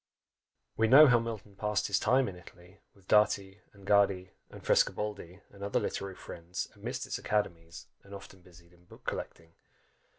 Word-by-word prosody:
We 110 - +3
know 140 +6 +9
how 125 -4 +5
Milton 110 -3 -7
passed 105 +1 -1
his 100 -1 +1
time 130 +3 +2
in 95 - -6
Italy, 90 +2 -16 0.2
with 95 -1 -24
Dati, 100 -2 +2
and 100 -1 -17
Gaddi, 100 -2 +2 0.2
and - - -13
Frescobaldi, 100 -3 0
and 100 0 -12
other 100 - 0
literary 100 -1 -4
friends, 90 +2 -7
amidst 125 +6 -5
its - - -4
academies, 85 -6 -3 0.2
and 100 0 -12
often 100 -1 -13
busied 85 -1 -19
in 90 0 -24
book - - -17
collecting. 80 -1 -6
100 Hz, 165 wpm, -30 LUFS, 90-105 Hz, 0.2 s, know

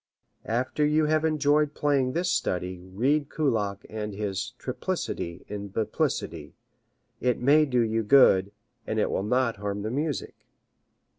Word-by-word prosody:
After 130 +6 0
you 150 +1 +3
have 155 +1 +2
enjoyed 150 -1 +2
playing 135 -3 +1
this 175 +1 0
study 90 0 -1
read 130 +11 0
Kullak 105 -9 -1
and 105 -2 -5
his 100 +3 -3
"triplicity 125 - -4
in 100 0 -5
biplicity." 105 +2 -2 0.6
It 125 -1 +1
may 150 +4 +4
do 125 -2 +2
you 115 0 +1
good, 105 -5 +5 0.4
and 110 - -2
it 105 - +1
will - - 0
not 115 +2 +1
harm 100 0 -4
the 110 - -3
music. 145 +2 -3
120 Hz, 140 wpm, -27 LUFS, 105-145 Hz, 0.6 s, good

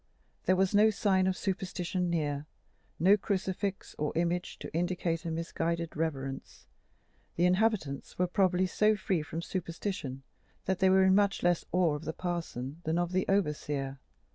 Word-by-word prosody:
There 185 - +4
was 190 +1 +2
no 210 +2 +6
sign 195 -3 +2
of 185 -1 0
superstition 180 -2 -2
near, 150 -3 -1 0.5
no 190 +5 +6
crucifix 195 0 -2
or 150 0 0
image 175 +1 -1
to - - -8
indicate 175 0 -1
a - - -1
misguided 165 0 -2
reverence: 135 -4 -4 0.7
the 175 - +3
inhabitants 185 -7 +1
were 180 - +3
probably 185 0 +2
so 215 +4 +3
free 190 -4 0
from 160 +2 -5
superstition 170 -7 -4 0.4
that 190 -1 0
they 190 - +5
were 190 0 +5
in 190 0 +5
much 200 -1 +2
less 175 -1 +2
awe 175 -3 +3
of 150 +2 -5
the 160 - -3
parson 165 -5 -4
than 160 +2 0
of 175 0 0
the 185 0 0
overseer. 150 -7 0
175 Hz, 160 wpm, -31 LUFS, 160-190 Hz, 0.7 s, no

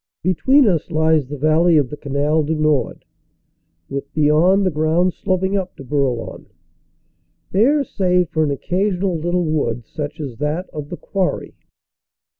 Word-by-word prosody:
Between 220 - +3
us 170 -5 0
lies 160 -3 +2
the 145 +2 -6
valley 155 +3 +3
of 140 -3 +1
the - - -4
Canal 145 +2 0
du 155 +2 -1
Nord, 155 -5 0 0.8
with 140 0 -6
beyond 160 +6 +3
the 185 - +1
ground 160 +4 +1
sloping 190 0 -1
up 190 -2 -3
to - - -10
Bourlon, 135 -3 -2 1.0
bare 275 +9 +3
save 180 -7 +1
for 155 - 0
an 150 - 0
occasional 185 +5 -1
little 175 +2 -1
wood, 125 -7 -1
such 150 +5 -6
as 135 -7 -6
that 150 +5 -2
of 150 -1 -7
the 175 - -6
Quarry. 190 -2 -2
160 Hz, 150 wpm, -19 LUFS, 150-180 Hz, 1.0 s, Between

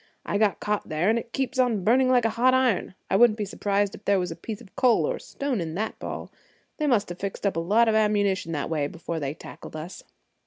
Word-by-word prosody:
"I 205 - -1
got 215 -2 +2
caught 210 -2 -2
there, 165 +6 +2
and 230 - +2
it 230 - -10
keeps 265 0 -2
on 235 -6 +2
burning 255 +5 +4
like 250 -2 +4
a 225 - +2
hot 255 +3 +3
iron. 245 -8 +1 0.2
I - - +3
wouldn't 225 0 +5
be 210 - -2
surprised 200 0 0
if - - -11
there 200 -1 +3
was 180 -2 -1
a - - -5
piece 215 +3 -6
of 190 - -17
coal 250 -3 +3
or - - -1
a - - -11
stone 275 -8 -3
in 160 -1 -4
that 220 +4 -3
ball. - - -6 0.5
They 305 - 0
must 220 -8 +2
have 175 - -7
fixed 200 +1 -4
up 200 - +1
a - - 0
lot 210 +8 +3
of 220 - +3
ammunition 205 -4 +1
that 145 +1 -3
way 150 -3 0
before 170 +1 -5
they 140 0 -3
tackled - - -11
us." 155 +4 -7
210 Hz, 260 wpm, -26 LUFS, 180-235 Hz, 0.5 s, wouldn't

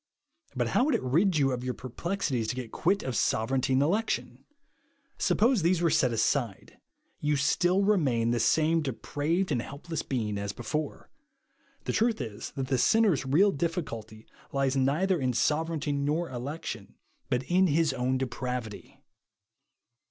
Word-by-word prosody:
But - - 0
how 250 - +3
would 300 -4 +2
it - - -2
rid 165 +8 +2
you 135 -2 +3
of 125 -1 -3
your 125 -1 -3
per 130 - -8
plexities 135 - -2
to - - -2
get 125 -3 -6
quit 195 +4 +1
of 130 -2 -3
sovereignty 130 +6 +1
and 130 +2 +4
election? 205 +9 -1 0.7
Suppose 230 0 +3
these 170 +1 +2
were 170 -2 +2
set 130 -3 +3
aside, 115 -1 -1 0.4
you 150 0 +1
still 175 +7 +2
remain 135 - +2
the 120 - +1
same 160 +4 +3
dejDraved 150 +6 -2
and 125 -5 +1
helpless 150 +5 -5
being 110 -6 -2
as 100 0 -4
before. 145 +6 -4 0.7
The - - -2
truth 225 0 +1
is, 110 -1 -5
that 135 - -2
the 130 -2 +1
sinner's 205 - +3
real 185 +10 +4
difficulty 125 - -4 0.3
lies 135 -1 0
neither 155 +7 +1
m 130 -1 0
sovereignty 155 +3 0
nor 145 +4 -1
election, 125 -4 -6 0.3
but 125 +1 0
in 180 +7 +3
his 155 -2 +2
own 130 0 0
dejpravity. 125 -4 -5
140 Hz, 155 wpm, -28 LUFS, 125-170 Hz, 0.7 s, and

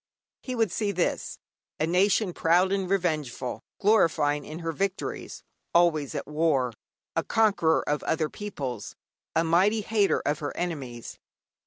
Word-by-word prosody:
He 255 - -4
would 225 -5 +1
see 205 +1 0
this: 180 -3 -1 0.4
A 155 - +2
nation 185 +3 +2
proud 175 +4 +3
and 195 -2 0
revengeful, 155 -10 -1 0.2
glorying 155 -8 +3
in 155 - -7
her 165 -1 -3
victories, 195 +3 -3 0.3
always 160 -5 +3
at - - -3
war, 150 -5 +1 0.4
a - - +1
conqueror 205 -8 +2
of 150 -1 0
other 160 -1 0
peoples, 140 - -6 0.4
a 165 - +3
mighty 190 +7 +3
hater 205 -1 +2
of 145 +1 0
her 145 - -5
enemies. 135 -9 -5
165 Hz, 140 wpm, -27 LUFS, 150-195 Hz, 0.4 s, proud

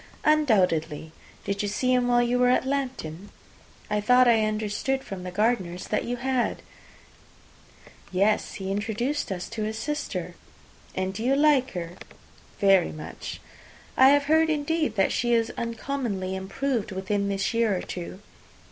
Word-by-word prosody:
"Undoubtedly. 180 - +2 0.3
Did 200 0 -2
you 205 - -1
see 255 +5 +1
him 250 -1 +2
while 240 0 +4
you 245 +1 +1
were 250 0 +4
at 255 - +2
Lambton? 250 - -3 0.6
I 210 0 0
thought 250 +4 +5
I 225 -2 +4
understood 215 +5 -1
from 195 -2 -7
the 180 - -5
Gardiners 185 -3 0
that 210 - 0
you 245 - -2
had." 255 0 -1 1.5
"Yes; 200 +3 +1
he 195 -1 -4
introduced 225 +6 -2
us 180 -2 -4
to 220 - -5
his 215 +1 -2
sister." 295 +5 -3 0.6
"And 190 0 -1
do 220 +3 -5
you 265 +3 +3
like 285 -3 +3
her?" 175 -1 -5 0.6
"Very 195 -3 +4
much." 155 - -8 0.5
"I 260 +1 +7
have 285 0 +4
heard, 320 +2 +3
indeed, 310 -4 0
that 195 -2 +2
she 240 0 +1
is 230 +1 +1
uncommonly 230 -5 -3
improved 210 +4 -2
within 200 +1 -1
this 195 +2 -1
year 230 -4 +2
or - - -5
two. 180 +2 -7
220 Hz, 155 wpm, -26 LUFS, 195-255 Hz, 1.5 s, I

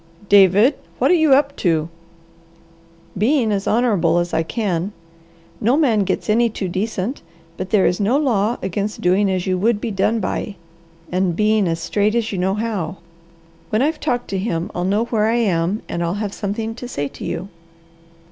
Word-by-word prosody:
"David, 205 +6 +6 0.2
what - - +2
are - - +6
you 315 -5 +5
up 280 0 +1
to?" 160 -4 +1 1.3
"Being 230 +2 +2
as 200 -1 -1
honourable 205 -8 +2
as 175 0 -1
I 160 - +2
can. 190 0 -2 0.7
No 240 +6 +2
man 230 -10 +2
gets 190 - -2
any 230 +2 +3
too 200 -3 -4
decent, 195 +6 -3 0.3
but 185 +2 -5
there 210 -4 +3
is 180 - +1
no 215 +7 +2
law 235 -6 +1
against 200 +3 -3
doing 190 +3 +3
as 185 -1 -1
you 185 -1 0
would 215 +2 +2
be 225 +1 -3
done 210 +3 +1
by, 200 +1 -3 0.6
and 180 -1 0
being 215 0 +2
as 165 0 -1
straight 210 +5 0
as 230 -2 0
you 195 - -3
know 190 +2 +1
how. 205 -6 -3 0.7
When 215 +4 +1
I've 305 +2 0
talked 245 -5 -1
to 195 - -2
him, 175 -4 -2
I'll 175 - -2
know 205 +4 +1
where 220 -3 +1
I 230 - +2
am 195 -3 0
and 170 - -3
I'll 170 +2 -1
have 205 -1 -3
something 220 +2 -3
to 245 +2 -8
say 145 -12 -3
to - - -11
you." 185 +4 -4
205 Hz, 185 wpm, -20 LUFS, 185-230 Hz, 1.3 s, David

